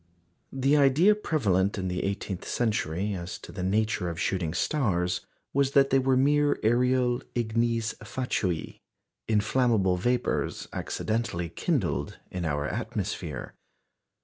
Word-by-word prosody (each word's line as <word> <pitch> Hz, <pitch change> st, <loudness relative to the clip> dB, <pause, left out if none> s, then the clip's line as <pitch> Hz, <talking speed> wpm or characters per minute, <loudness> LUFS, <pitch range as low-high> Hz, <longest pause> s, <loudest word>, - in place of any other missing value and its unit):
The 135 Hz, +2 st, +2 dB
idea 145 Hz, +9 st, +5 dB
prevalent 105 Hz, -, +1 dB
in 95 Hz, -1 st, -2 dB
the 90 Hz, -1 st, -2 dB
eighteenth 100 Hz, -2 st, -3 dB
century 105 Hz, -4 st, -1 dB
as 90 Hz, -1 st, -5 dB
to -, -, -11 dB
the 95 Hz, -, -6 dB
nature 100 Hz, -1 st, 0 dB
of 85 Hz, 0 st, -5 dB
shooting 90 Hz, -4 st, 0 dB
stars 90 Hz, -, 0 dB, 0.3 s
was 140 Hz, 0 st, +2 dB
that 135 Hz, -1 st, +5 dB
they 135 Hz, -, +5 dB
were 130 Hz, 0 st, +2 dB
mere 145 Hz, +2 st, +3 dB
aerial 125 Hz, +2 st, +2 dB
ignes 115 Hz, -1 st, 0 dB
fatui 100 Hz, -6 st, -2 dB, 0.5 s
inflammable 110 Hz, -3 st, +2 dB
vapours 120 Hz, +6 st, -1 dB
accidentally 110 Hz, -7 st, -2 dB
kindled 110 Hz, -, -1 dB
in 90 Hz, -2 st, -3 dB
our 75 Hz, -2 st, -1 dB
atmosphere. 70 Hz, 0 st, -4 dB
110 Hz, 120 wpm, -27 LUFS, 90-130 Hz, 0.5 s, idea